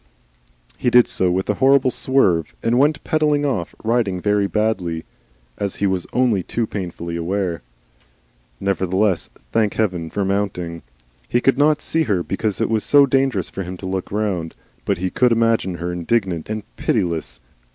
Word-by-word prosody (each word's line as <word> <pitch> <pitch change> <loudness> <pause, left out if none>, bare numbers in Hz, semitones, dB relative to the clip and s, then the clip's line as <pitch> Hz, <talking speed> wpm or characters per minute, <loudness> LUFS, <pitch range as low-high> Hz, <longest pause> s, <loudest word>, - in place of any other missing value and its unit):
He 125 - +2
did 120 0 +6
so 95 - +2
with 95 +2 -1
a 105 - +2
horrible 135 -1 +5
swerve, 95 - +1
and 120 +2 +2
went 150 +3 +2
pedalling 150 -2 +1
off, 115 - -2
riding 110 -5 +1
very 105 +1 +1
badly, 95 -7 -1 0.5
as 100 -2 -2
he 100 - -1
was 95 -2 -1
only 120 -6 +2
too 115 +6 -2
painfully 85 -5 -5
aware. 85 -1 -2 1.0
Nevertheless, 95 0 0 0.2
thank 110 -3 +1
Heaven 90 -7 -1
for 100 - -3
the - - +1
mounting! 90 -5 -3 0.5
He - - +2
could 135 +2 +2
not 150 0 +3
see 165 - 0
her 95 -7 0
because 100 +2 -2
it - - +1
was 110 -1 +1
so 145 -1 +6
dangerous 135 -8 0
for - - -5
him 90 0 -6
to 95 - -9
look 95 0 -3
round, 95 -6 -2 0.3
but - - 0
he 90 +1 -2
could 125 -1 +3
imagine 115 -5 +2
her 85 +1 -4
indignant 90 -1 -1
and 110 -1 -3
pitiless. 80 -9 -1
100 Hz, 170 wpm, -20 LUFS, 90-120 Hz, 1.0 s, did